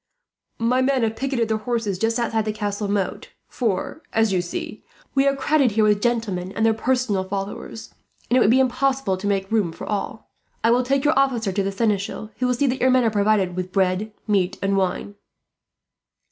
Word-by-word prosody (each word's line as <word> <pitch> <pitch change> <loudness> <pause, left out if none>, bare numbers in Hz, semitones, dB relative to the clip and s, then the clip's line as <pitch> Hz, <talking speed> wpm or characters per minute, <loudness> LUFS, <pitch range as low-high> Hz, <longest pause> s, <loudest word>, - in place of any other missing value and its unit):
My 245 +3 +2
men 260 -1 +2
have 225 0 0
picketed 260 -2 -1
their 220 0 0
horses 220 -5 -2
just 225 +2 +1
outside 225 -2 0
the 215 - 0
castle 205 -1 -3
moat; 200 -2 -2 0.2
for, 235 +6 -2
as 220 -3 +2
you 180 - +2
see, 175 - -6 0.3
we 275 0 +3
are 275 - +3
crowded 275 -3 +2
here 220 0 +3
with 210 -1 +3
gentlemen 210 -6 -1
and 220 - 0
their 225 - +4
personal 235 -4 0
followers, 200 +3 -6 0.3
and 245 - +1
it - - +6
would 210 - +4
be 255 +3 +5
impossible 265 -4 +1
to 190 +2 -4
make 195 -1 -1
room 210 -7 +1
for - - -8
all. 210 +1 -4 0.3
I 230 - +4
will 245 +1 +4
take 270 +3 0
your 300 - +4
officer 240 -7 +1
to 200 +2 0
the 195 0 -1
seneschal, 210 0 -1
who 250 - +1
will 250 - +1
see 285 - +1
that 260 0 -1
your 260 - +4
men 255 -1 +4
are 225 - +2
provided 205 -3 +2
with 185 0 -4
bread, 190 +2 0
meat, 200 -2 +1
and 195 0 0
wine. 195 +1 -1
220 Hz, 205 wpm, -22 LUFS, 200-250 Hz, 0.3 s, it